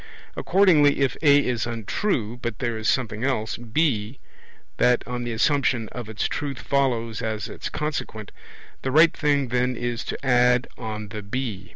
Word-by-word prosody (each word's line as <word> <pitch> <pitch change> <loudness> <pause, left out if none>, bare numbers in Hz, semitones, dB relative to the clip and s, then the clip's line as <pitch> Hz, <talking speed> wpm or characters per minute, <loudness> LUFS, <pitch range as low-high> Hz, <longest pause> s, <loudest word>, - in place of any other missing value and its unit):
Accordingly, 160 -7 +4
if 135 -3 +1
A 145 -2 +5
is 120 -1 -1
untrue, 120 - -2
but 120 -3 -3
there 120 -3 -2
is 110 -1 -1
something 115 -3 -1
else, 125 -5 -1
B, 120 -1 -1 0.6
that 125 -1 +2
on 125 -1 -4
the 120 - -3
assumption 120 -2 +1
of 120 -3 -7
its 110 - -1
truth 140 -3 -4
follows 120 -6 -1
as 110 -1 -3
its - - -6
consequent, 130 -9 -4 0.5
the 130 - -2
right 160 +5 +5
thing 145 -3 +1
then 125 +1 0
is 120 0 -3
to - - -4
add 125 -1 +3
on 110 -3 -6
the 105 0 -6
B. 105 -3 -4
125 Hz, 165 wpm, -24 LUFS, 110-140 Hz, 0.6 s, A